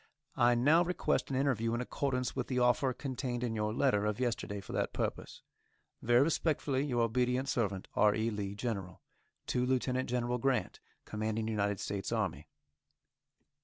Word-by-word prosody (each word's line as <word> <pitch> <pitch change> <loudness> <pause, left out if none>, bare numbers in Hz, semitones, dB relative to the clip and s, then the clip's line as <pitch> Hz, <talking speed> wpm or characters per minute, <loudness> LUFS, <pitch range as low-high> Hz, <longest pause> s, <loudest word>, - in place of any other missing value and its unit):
I 120 0 +4
now 150 +8 +5
request 180 +1 0
an 135 - -2
interview 120 -4 +1
in - - -2
accordance 125 0 -2
with - - -2
the 130 - -2
offer 125 +2 +3
contained 125 -2 -4
in 120 -2 -1
your 105 -1 -1
letter 110 -3 +2
of 105 +1 -2
yesterday 115 -5 -2
for 95 - -9
that - - -1
purpose. - - -4 0.6
Very 120 +3 +5
respectfully, 150 -3 0
Your 125 -5 +1
obedient 125 +3 +1
servant, 100 -7 -1
R. 105 0 +4
E. 110 +2 0
LEE, 100 -1 -4
General. 100 -5 -4 0.5
_To 125 0 +1
Lieutenant 130 0 0
General 125 0 0
Grant, 135 +1 0 0.3
Commanding 110 +1 -2
United 100 -3 0
States 100 -1 -3
Army. - - -2
120 Hz, 160 wpm, -33 LUFS, 110-130 Hz, 0.6 s, now